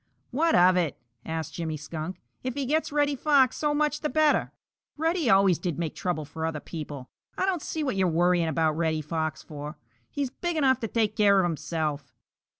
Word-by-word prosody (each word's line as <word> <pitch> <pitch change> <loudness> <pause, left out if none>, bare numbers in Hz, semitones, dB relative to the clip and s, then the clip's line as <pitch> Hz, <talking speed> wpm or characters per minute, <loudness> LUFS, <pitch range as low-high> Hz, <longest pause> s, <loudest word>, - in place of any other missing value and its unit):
"What 320 +6 +2
of 185 +1 +6
it?" 165 -6 0 0.3
asked 160 -2 -4
Jimmy 160 -2 -3
Skunk. 160 +4 -6 0.2
"If 255 -1 -3
he 280 -1 -2
gets 310 +4 0
Reddy 290 -1 +2
Fox, 275 -2 +3
so 295 -1 0
much 300 0 +1
the 300 - -2
better. 310 -1 +2 0.5
Reddy 325 -3 +1
always 195 -4 +5
did 170 -4 -3
make 165 -3 -2
trouble 170 -4 -2
for 160 +2 -7
other 160 -2 -1
people. 145 -5 -7 0.3
I - - +1
don't 370 -4 0
see 315 +1 -3
what 265 -7 -1
you're 190 -1 +2
worrying 175 0 +2
about 160 -1 +1
Reddy 160 -1 0
Fox 155 0 -3
for. 150 0 -8 0.3
He's 280 -3 -3
big 345 +3 -3
enough 265 -4 +3
to 225 - -2
take 215 -1 0
care 200 -2 +5
of 190 - +4
himself." 155 -4 -3
180 Hz, 195 wpm, -27 LUFS, -, 0.5 s, of